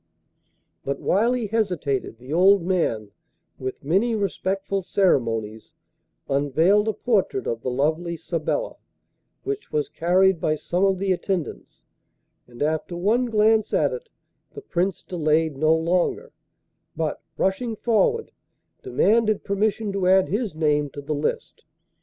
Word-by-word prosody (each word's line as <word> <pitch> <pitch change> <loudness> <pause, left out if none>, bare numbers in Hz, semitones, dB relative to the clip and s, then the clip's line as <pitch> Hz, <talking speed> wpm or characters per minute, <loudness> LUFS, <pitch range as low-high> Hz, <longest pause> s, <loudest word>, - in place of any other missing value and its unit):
But 140 - -3
while 225 +6 +2
he 245 -3 -1
hesitated 180 - -1
the 125 +5 -8
old 190 +2 +5
man, 140 - -1 0.5
with 130 +1 -5
many 195 - +1
respectful 195 -1 -2
ceremonies, 115 - 0 0.5
unveiled 160 +10 +2
a 220 - +1
portrait 205 -4 0
of 115 0 -3
the 130 - -2
lovely 160 +6 -1
Sabella, 170 - -3 0.7
which 415 0 -4
was 150 -1 -1
carried 180 +3 +2
by 155 - +1
some 175 +4 -2
of 195 -1 +2
the 195 +1 -1
attendants, 185 -2 -3 0.6
and 120 +2 -5
after 160 +3 -2
one 220 +8 +2
glance 220 -1 +2
at - - +2
it 480 -1 -8 0.5
the 430 - -7
Prince 185 - -1
delayed 160 -3 0
no 155 +3 +3
longer, 180 - 0 0.6
but, - - -2 0.2
rushing 220 +5 0
forward, 345 - +1 0.5
demanded 220 - +2
permission 205 +1 -1
to 195 -2 -1
add 190 0 +4
his 210 -4 -2
name 150 -2 +1
to 145 - -8
the 155 +2 -2
list. 150 +1 -3
185 Hz, 135 wpm, -23 LUFS, 155-210 Hz, 0.7 s, old